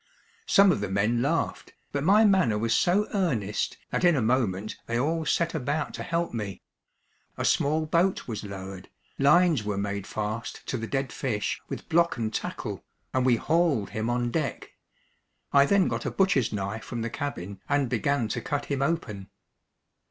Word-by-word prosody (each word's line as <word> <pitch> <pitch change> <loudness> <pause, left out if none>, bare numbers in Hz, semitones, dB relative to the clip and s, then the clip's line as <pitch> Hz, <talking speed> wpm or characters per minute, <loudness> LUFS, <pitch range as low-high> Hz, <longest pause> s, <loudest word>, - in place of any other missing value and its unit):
Some 200 -1 +6
of 145 - -1
the 100 - -2
men 105 +5 +1
laughed, 160 +6 -1 0.2
but 140 -1 -2
my 205 +6 +6
manner 185 - +3
was 115 +1 +1
so 195 - +3
earnest 125 - -1
that - - -1
in 175 -2 +5
a 135 - +1
moment 110 -4 0
they 120 - -1
all 160 +5 0
set 170 +1 +1
about 150 0 -2
to - - -6
help 170 -2 -1
me. 105 -4 -5 0.7
A - - -2
small 155 +2 +2
boat 170 +4 +1
was 110 -3 -4
lowered, 95 -2 -8 0.3
lines 160 -2 +4
were 105 -1 -2
made 100 0 -3
fast 110 +2 -4
to 130 - -1
the 115 - -4
dead 135 0 -2
fish 110 -6 -2
with - - -6
block 170 -2 +2
and 110 -2 -2
tackle, - - -4 0.3
and 130 0 +2
we 125 - +5
hauled 155 - +1
him 110 +1 -2
on 120 0 0
deck. 155 -1 -3 0.8
I 140 0 +6
then 200 +1 +4
got - - -2
a - - +1
butcher's 180 - +2
knife 105 +2 -3
from 120 -2 -4
the 115 - -2
cabin 100 - -5
and 140 -2 +2
began 120 +1 0
to - - -2
cut 145 -1 -2
him 140 -2 -2
open. 130 - -2
130 Hz, 180 wpm, -27 LUFS, 110-160 Hz, 0.8 s, Some